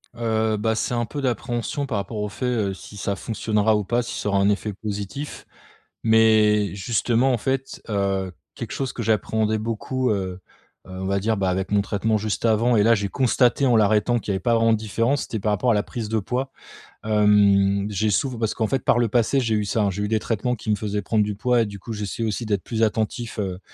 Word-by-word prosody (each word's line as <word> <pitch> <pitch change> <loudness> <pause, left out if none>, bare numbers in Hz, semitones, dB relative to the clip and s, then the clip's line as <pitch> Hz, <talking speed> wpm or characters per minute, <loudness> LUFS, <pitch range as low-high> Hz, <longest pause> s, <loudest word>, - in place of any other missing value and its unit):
Heu, 110 -2 0
bah, 110 +2 0
c'est 120 - -1
un 120 -1 0
peu 145 +6 -5
d'appréhension 120 +2 -2
par 115 -6 -2
rapport 100 +2 -4
au 105 - -2
fait, 125 - -5
heu, 110 -6 0
si 105 - -12
ça 100 0 -2
fonctionnera 110 0 0
ou 105 - 0
pas 120 +5 0
si - - -5
ça 105 - -2
aura 100 - +2
un 100 +1 +3
effet 105 +1 -1
positif, 105 +8 -6 0.6
mais 110 -2 +4
justement, 120 +5 +1
en - - +1
fait, 135 +2 -3
heu, 100 -2 -1 0.2
quelque - - -7
chose 135 -2 -3
que - - -5
j'appréhendais 110 0 +1
beaucoup, 115 +3 -2
heu - - +2 0.7
heu, - - -11
on 95 0 -5
va 100 +1 0
dire, 110 +3 0
bah, 95 -2 0
avec 95 +1 -2
mon 105 -1 +3
traitement 110 +2 0
juste 105 +2 -2
avant 115 +2 +3
et 105 - +4
là 115 +2 +5
j'ai 100 -2 -2
constaté 130 +2 +2
en 125 -3 +4
l'arrêtant 110 +2 +3
qu'il 105 - -3
y - - 0
avait - - -1
pas 115 +5 +1
vraiment 115 0 +3
de 110 - +3
différence, 115 +6 0
c'était 110 - -4
par 105 +2 0
rapport 105 +5 +2
à - - +4
la 105 -1 +1
prise 115 -2 -5
de 110 +1 0
poids, 125 +6 -3 0.5
hem, 100 -2 +4
j'ai 105 +1 0
souvent 120 +5 0
parce 110 -2 -1
qu'en 110 - -1
fait 135 +1 -1
par 120 - +3
le 120 - +2
passé, 120 +4 +2
j'ai 115 -4 0
eu 105 - 0
ça, 105 +2 0
hein, 100 - +2
j'ai 100 +2 -3
eu 105 - -2
des 110 0 +2
traitements 115 +3 -1
qui 110 - -7
me 105 - +3
faisait 105 0 -3
prendre 105 +2 +1
du 105 0 -2
poids 120 +3 +2
et - - +2
du 100 -1 -8
coup, 115 - -7
j'essaie 105 +1 -4
aussi 110 +1 -2
d'être 100 -3 0
plus 115 -1 -1
attentif, 110 +1 -1
heu, 95 -3 -3
110 Hz, 245 wpm, -23 LUFS, 105-115 Hz, 0.7 s, là